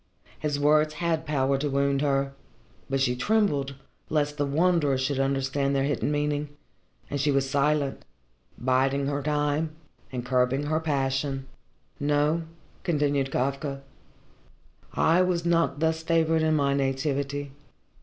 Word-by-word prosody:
His 150 -2 -1
words 155 +1 +3
had 165 -3 -1
power 135 -2 +1
to 145 +1 -1
wound 140 0 +1
her, 135 -1 +1 0.6
but 135 0 0
she 125 -2 +2
trembled 145 - +1 0.3
lest 150 -1 0
the 145 -1 0
Wanderer 155 -2 +2
should 135 +1 -1
understand 135 +1 0
their 135 - +2
hidden 145 +1 0
meaning, 145 0 -1 0.6
and 140 -1 -1
she 150 - +2
was 135 -1 +2
silent, 140 0 0 0.5
biding 135 +2 +1
her 140 0 -1
time 150 +2 0 0.4
and 125 -2 -4
curbing 125 +2 +1
her 155 +2 0
passion. 135 -2 -1 0.5
"No," 150 +3 +2 0.4
continued 145 -4 +1
Kafka, 135 +1 -2 1.1
"I 165 +3 +4
was 180 -2 0
not 165 -4 +1
thus 160 0 +1
favoured 160 -1 +2
in 155 0 +2
my 140 -2 +2
nativity. 140 +1 -1
145 Hz, 135 wpm, -26 LUFS, 135-150 Hz, 1.1 s, I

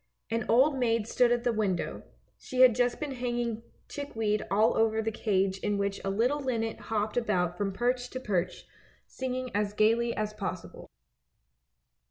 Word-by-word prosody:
An 230 0 -1
old 265 +4 +4
maid 230 -3 +1
stood 240 0 +3
at 240 0 +1
the 240 -1 +1
window, 200 -5 -1 0.3
she 255 0 -2
had 255 -2 +8
just 245 +1 +1
been 300 -2 -3
hanging 240 -3 -2 0.3
chickweed 225 -7 -2
all 215 +4 +3
over 220 0 +2
the 220 0 -1
cage 195 -3 0
in 205 0 -1
which 200 0 -2
a 195 - -1
little 240 +9 +1
linnet 230 -5 -2
hopped 215 +1 -1
about 180 -7 +1
from 195 +1 -1
perch 245 +4 -1
to 255 - -5
perch, 185 -7 -2 0.4
singing 255 -1 -4
as 205 0 0
gaily 230 +3 +2
as 215 0 -2
possible. 195 -4 -6
225 Hz, 165 wpm, -29 LUFS, 205-245 Hz, 0.4 s, had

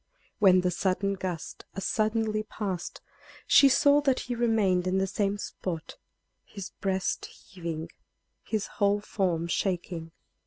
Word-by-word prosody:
When 185 -2 +6
the 180 0 +1
sudden 195 +2 0
gust 185 -4 -5
as 195 - -4
suddenly 215 0 +1
passed, 195 -4 -5 0.4
she 280 - +7
saw 285 +2 +5
that 270 -3 +2
he 245 - -4
remained 215 -6 +2
in 185 +1 +1
the 190 - +2
same 200 +1 -1
spot, 175 -5 -5 0.5
his 200 -3 -8
breast 190 -1 -2
heaving, 165 -3 -7 0.5
his 215 -2 -2
whole 205 0 +1
form 180 -5 -1
shaking. 170 -2 -2
195 Hz, 130 wpm, -28 LUFS, 180-215 Hz, 0.5 s, she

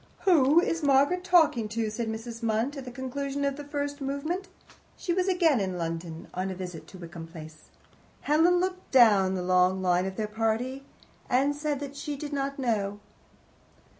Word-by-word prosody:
"Who 310 -4 +5
is 340 -3 0
Margaret 285 +5 +3
talking 315 -12 +3
to?" 220 0 -2
said 230 +1 -3
Mrs. 225 +1 -6
Munt, 230 +5 0
at 275 -2 -7
the 250 - -7
conclusion 275 +2 -3
of 280 -1 0
the 290 - -7
first 285 0 -4
movement. 310 +8 -3 0.5
She 350 - -2
was 370 +1 0
again 335 - +3
in 190 -2 -2
London 165 -1 -5
on 185 +1 -2
a 190 - -4
visit 175 -4 -7
to 190 - -12
Wickham 170 -2 -9
Place. 155 -2 -12 0.5
Helen 325 +4 +4
looked 370 0 -3
down 205 -7 +5
the 180 - -2
long 185 +1 +3
line 180 0 +2
of 190 - -5
their 215 - -1
party, 225 +5 -2 0.4
and 275 +3 +2
said 295 -1 -2
that 280 0 -6
she 290 +1 -4
did 290 +1 -6
not 275 0 -2
know. 205 -6 -1
255 Hz, 180 wpm, -28 LUFS, 190-290 Hz, 0.5 s, Who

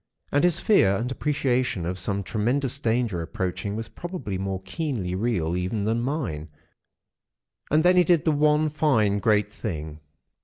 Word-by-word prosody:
And 145 - +2
his 175 -2 +3
fear 100 - +4
and 120 +5 -2
appreciation 130 - 0
of 90 +2 -3
some 100 +2 -2
tremendous 125 +7 -1
danger 115 - 0
approaching 95 +4 -3
was 115 0 -4
probably 175 - -6
more 95 -1 -2
keenly 125 - -3
real 95 -5 0
even 95 +4 -2
than 115 +2 0
mine. 115 - -3 1.2
And 155 +2 +3
then 180 +1 +5
he 180 - +7
did 170 -2 +2
the 160 - +4
one 150 +1 +3
fine, 115 -10 +2
great 105 0 +2
thing!" 80 -8 -5
115 Hz, 155 wpm, -25 LUFS, 95-150 Hz, 1.2 s, he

